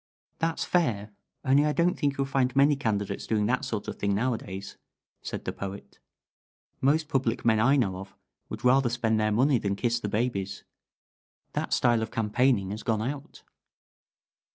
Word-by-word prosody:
"That's 165 0 -1
fair, 110 - 0 0.3
only 135 +2 +5
I 150 0 +1
don't 175 +2 +2
think 140 -3 -1
you'll 135 - +1
find 135 -1 0
many 140 +2 +5
candidates 105 -7 -2
doing 105 -2 +1
that 125 +5 0
sort 115 -6 -3
of - - -6
thing 100 -1 +1
nowadays," 100 -4 -3 0.5
said - - -6
the - - -2
Poet. 100 0 -8 0.8
"Most 150 +3 +2
public 130 -5 -1
men 110 -2 +4
I 135 +6 +4
know 100 -9 +1
of 95 +1 -10 0.3
would - - -6
rather 130 0 +4
spend 115 -2 0
their 110 0 +1
money 130 +4 +3
than 100 -1 -1
kiss 120 +2 0
the 105 - -3
babies. 105 -3 -2 0.9
That - - -2
style 120 -2 +3
of 110 - -3
campaigning 110 -2 +1
has 105 +2 -5
gone 110 -2 0
out." 140 +3 -6
120 Hz, 170 wpm, -27 LUFS, 105-135 Hz, 0.9 s, only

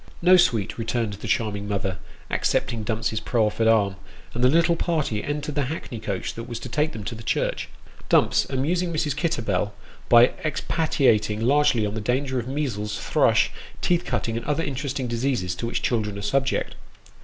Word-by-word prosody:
"No, 180 +2 +6
sweet," 115 - +2
returned 115 -1 -1
the 100 - -7
charming 100 -3 -1
mother, 95 -2 -2 0.3
accepting 115 -1 0
Dumps's 110 0 -1
proffered 110 -1 +1
arm; 100 -4 +3 0.4
and 120 - -2
the 125 - +6
little 170 +3 +4
party 155 -11 -1
entered 150 0 -3
the 145 -1 0
hackney 125 -5 -5
coach 100 -3 -3
that 115 - -7
was 120 -1 -5
to 130 - -6
take 150 +5 0
them 110 - -6
to 115 - -4
the 110 - -9
church; - - -1 0.4
Dumps - - +4
amusing 170 +7 0
Mrs. 150 -3 -1
Kitterbell 110 - -1 0.3
by 120 0 +7
expatiating 135 -8 +1
largely 125 -3 +3
on 105 - -3
the 110 - -3
danger 130 +3 0
of 120 - -5
measles, 120 -7 -2
thrush, - - +2 0.3
teeth 175 -1 +1
cutting, 115 -2 -2
and 115 - -4
other 150 +2 0
interesting 135 -1 -3
diseases 120 -6 -1
to 115 - -4
which 120 - -2
children 105 -4 0
are 100 - -6
subject. 135 +5 0
120 Hz, 175 wpm, -24 LUFS, 105-145 Hz, 0.4 s, by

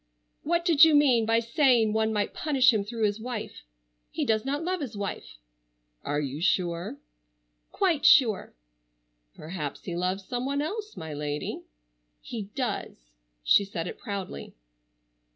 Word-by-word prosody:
"What 340 +2 0
did 325 -4 +6
you 320 -2 +7
mean 255 -6 +4
by 225 0 +3
saying 230 -2 +3
one 220 0 +1
might 210 -1 -1
punish 265 -5 +3
him 210 -2 0
through 225 +2 -4
his 205 +1 -1
wife? 235 -1 -6 0.5
He - - -2
does 220 -1 +1
not 285 +4 -2
love 365 0 -2
his 240 -7 -5
wife." 195 - -5 0.7
"Are 145 +1 -1
you 145 +1 -4
sure?" 175 - 0 0.7
"Quite 345 -7 +1
sure." 230 - +4 0.8
"Perhaps 155 -3 -6
he 175 - -5
loves 185 +2 -2
some 245 +3 -3
one 280 +1 -1
else, 420 +8 -4
my 160 -1 -6
lady." 150 0 -4 0.6
"He 215 -4 -7
does." - - -4 0.3
She 130 - +5
said 185 -4 -5
it - - -7
proudly. 195 - -6
220 Hz, 150 wpm, -27 LUFS, 180-275 Hz, 0.8 s, you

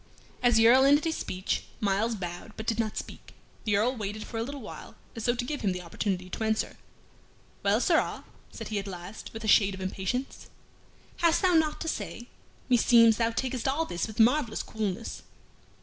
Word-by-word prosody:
As 245 -1 +4
the 225 0 +6
Earl 260 +3 +7
ended 290 +2 +5
his 320 -1 0
speech, 185 +1 -3
Myles 210 +3 +1
bowed, 175 +2 -6
but 220 - -5
did 225 0 -1
not 220 -2 -1
speak. - - -8 0.3
The 210 -2 +2
Earl 240 +5 +2
waited 215 -1 -4
for 225 - -5
a - - 0
little 275 +4 -5
while, - - -10 0.2
as 225 - -5
though 240 0 +2
to 245 0 -2
give 295 +3 -4
him 195 -4 +1
the 180 0 -6
opportunity 185 +1 -2
to 200 - -4
answer. 220 0 -1 0.8
"Well, - - +3
sirrah," - - +1 0.3
said - - -7
he 210 -2 -1
at 200 - -6
last, 180 +2 -8
with 225 0 -8
a - - -3
shade 200 -2 +5
of - - -11
impatience, 190 +7 -3 0.7
"hast 335 -1 +3
thou 365 -1 +4
naught 315 -2 +2
to 325 - -3
say? 240 -5 -4 0.4
Meseems 230 -2 +6
thou 230 -1 +2
takest 255 +1 -2
all 295 +5 +1
this 175 - -3
with 220 +1 -9
marvellous 240 0 +3
coolness." 215 0 -4
225 Hz, 195 wpm, -28 LUFS, 200-250 Hz, 0.8 s, Earl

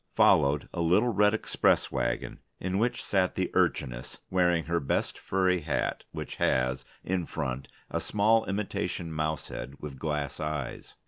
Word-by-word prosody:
Followed 70 +1 +4
a 85 - -2
little 90 +8 +3
red 105 +1 +4
express - - +2
wagon, - - -2 0.2
in 95 +1 -1
which 120 +2 0
sat 95 -2 +1
the - - -1
Urchiness, - - 0
wearing 90 -2 +3
her 85 +1 0
best 70 - -1
furry 95 -1 +2
hat 75 -3 -2
which - - -6
has, 65 0 +1 0.2
in 90 -2 -1
front, 65 -3 -3 0.2
a - - -1
small 110 +2 +3
imitation 95 -4 -2
mouse 80 -1 -2
head 70 - -6
with 70 -3 -7
glass 75 -3 -2
eyes. 75 -4 -4
85 Hz, 150 wpm, -29 LUFS, 75-95 Hz, 0.2 s, Followed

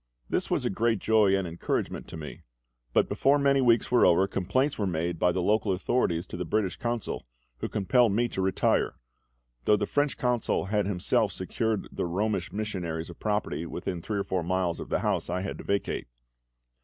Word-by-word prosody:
This - - -1
was - - 0
a - - +1
great 115 +3 +1
joy 105 -1 +4
and 95 -2 -2
encouragement 85 +1 -3
to - - -8
me; 75 -2 -8 0.5
but - - +3
before 140 +2 +3
many 140 -1 +3
weeks 120 -3 +3
were 125 - +5
over 95 +3 +5
complaints 100 +10 0
were 100 - +1
made 85 -1 -2
by 90 - +4
the 90 0 -1
local 105 0 +2
authorities 90 -3 0
to 90 - -7
the 90 - -2
British 105 -1 0
Consul, 120 - -3 0.3
who - - -3
compelled 115 +3 +3
me 120 +4 +2
to 95 - -3
retire; 95 0 +1 0.7
though 105 - +5
the 105 - 0
French 145 +5 0
Consul 125 -5 0
had 105 0 0
himself 90 -3 +1
secured 110 -2 -1
to - - -14
the - - -2
Romish 95 +1 -1
missionaries 90 -6 -3
a - - -9
property 105 -6 -2
within 90 0 -4
three 105 +4 -3
or 100 - 0
four 95 -2 -1
miles 90 0 -1
of - - -7
the - - 0
house - - 0
I 90 +1 -1
had 95 - -5
to - - -7
vacate. 100 -9 -1
100 Hz, 200 wpm, -28 LUFS, 90-110 Hz, 0.7 s, were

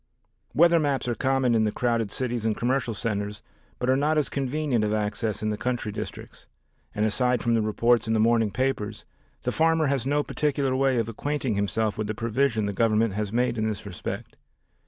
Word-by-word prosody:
Weather 170 +1 +6
maps 140 -4 0
are 120 - +1
common 135 -1 +1
in 110 -1 +3
the 105 - +1
crowded 115 -3 0
cities 120 -2 -2
and 110 -1 0
commercial 125 -2 0
centers, 105 -1 -3 0.3
but 125 - -2
are 130 - +4
not 150 +3 +1
as 150 - +2
convenient 135 -3 0
of 105 - 0
access 105 0 -2
in 110 - 0
the 105 - -4
country 120 -4 -2
districts, - - -8 0.5
and 105 - +1
aside 125 +2 +1
from 120 - +2
the 115 - +3
reports 115 +2 +2
in 110 - +1
the - - +2
morning 115 -1 +3
papers, 125 -2 -2 0.4
the - - 0
farmer 165 0 +3
has 135 -3 0
no 145 +1 +2
particular 140 -3 0
way 135 -1 +2
of 115 -2 0
acquainting 135 +2 -2
himself 105 +1 -1
with 110 - -1
the 110 - -3
provision 115 0 0
the 100 - -2
Government 110 0 +2
has 105 0 -2
made 120 0 0
in 110 - +1
this 105 -2 -4
respect. 100 +3 -6
115 Hz, 200 wpm, -26 LUFS, 110-135 Hz, 0.5 s, Weather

